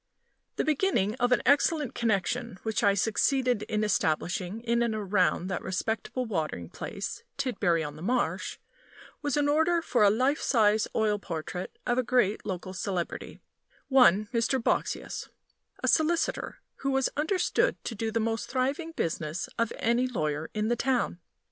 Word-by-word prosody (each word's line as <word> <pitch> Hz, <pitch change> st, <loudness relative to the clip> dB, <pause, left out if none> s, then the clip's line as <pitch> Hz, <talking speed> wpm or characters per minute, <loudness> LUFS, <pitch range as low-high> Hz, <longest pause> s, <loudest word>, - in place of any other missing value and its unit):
The -, -, 0 dB
beginning 305 Hz, -, +1 dB
of 245 Hz, 0 st, +2 dB
an 245 Hz, -, +3 dB
excellent 290 Hz, -1 st, +3 dB
connection 230 Hz, 0 st, -1 dB
which 220 Hz, -1 st, -1 dB
I 200 Hz, -1 st, +4 dB
succeeded 245 Hz, +3 st, +2 dB
in 215 Hz, 0 st, -1 dB
establishing 185 Hz, +1 st, 0 dB
in 235 Hz, 0 st, +1 dB
and 235 Hz, -2 st, +1 dB
around 195 Hz, -4 st, +1 dB
that 185 Hz, -, -2 dB
respectable 220 Hz, +6 st, -2 dB
watering 155 Hz, -, -3 dB
place, -, -, -5 dB, 0.2 s
Tidbury 180 Hz, -10 st, +1 dB
on 150 Hz, 0 st, -6 dB
the -, -, -10 dB
Marsh, 240 Hz, +7 st, -1 dB, 0.6 s
was 290 Hz, -2 st, 0 dB
an 290 Hz, 0 st, +2 dB
order 320 Hz, +4 st, +3 dB
for 260 Hz, -7 st, 0 dB
a 205 Hz, -, +7 dB
life 255 Hz, +8 st, +1 dB
size 215 Hz, -3 st, +3 dB
oil 210 Hz, -2 st, +2 dB
portrait 180 Hz, 0 st, -5 dB
of 245 Hz, 0 st, +1 dB
a -, -, +2 dB
great 240 Hz, -4 st, +2 dB
local 185 Hz, -1 st, -4 dB
celebrity 185 Hz, -2 st, -4 dB, 0.5 s
one 215 Hz, -7 st, +5 dB
Mr. 235 Hz, +3 st, +1 dB
Boxsious, 230 Hz, -, -2 dB, 0.5 s
a -, -, +1 dB
solicitor, 335 Hz, +9 st, +1 dB, 0.2 s
who 275 Hz, -, -2 dB
was 270 Hz, -1 st, +1 dB
understood 365 Hz, +10 st, +1 dB
to -, -, -4 dB
do 225 Hz, +1 st, -2 dB
the 225 Hz, +1 st, 0 dB
most 225 Hz, -1 st, -1 dB
thriving 275 Hz, +6 st, -1 dB
business 160 Hz, -, -2 dB
of 230 Hz, -1 st, +1 dB
any 235 Hz, +2 st, +2 dB
lawyer 155 Hz, -9 st, -2 dB
in 215 Hz, 0 st, 0 dB
the 240 Hz, -, +2 dB
town. 245 Hz, -7 st, 0 dB
225 Hz, 155 wpm, -28 LUFS, 195-255 Hz, 0.6 s, a